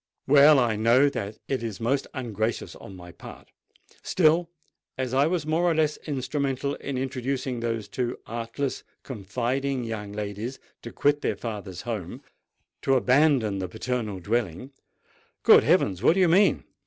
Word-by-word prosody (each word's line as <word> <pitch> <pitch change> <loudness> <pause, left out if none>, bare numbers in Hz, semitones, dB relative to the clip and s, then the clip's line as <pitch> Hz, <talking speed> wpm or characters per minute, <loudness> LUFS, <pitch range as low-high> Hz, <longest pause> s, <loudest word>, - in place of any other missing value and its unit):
Well—I 140 -5 +5
know 120 +6 +4
that 105 -5 -5
it 135 -3 -1
is 115 -3 -5
most 130 +4 0
ungracious 115 -3 -3
on 95 - -11
my 90 -1 -11
part: 85 - -13 0.5
still, 170 0 +2 0.5
as 130 -1 -3
I 140 +3 +4
was 170 -3 -1
more 160 +3 +1
or 170 -2 +2
less 155 -1 +1
instrumental 140 0 -2
in 140 -2 -5
inducing 130 -1 -3
those 115 -3 -3
too 120 +4 -3
artless, 120 +4 -4 0.2
confiding 125 +4 -2
young 110 -3 -5
ladies 105 +5 -5 0.2
to - - -8
quit 145 0 +1
their - - -1
father's 100 -6 -6
home—to 115 +4 -5
abandon 125 -5 +3
the 95 - -3
paternal 110 -2 -3
dwelling——" 110 - -2 0.7
"Good - - +7
heavens! 95 -1 +2
what 160 - +4
do - - +1
you 180 - +4
mean?" 185 -1 +4
125 Hz, 145 wpm, -26 LUFS, 110-140 Hz, 0.7 s, Good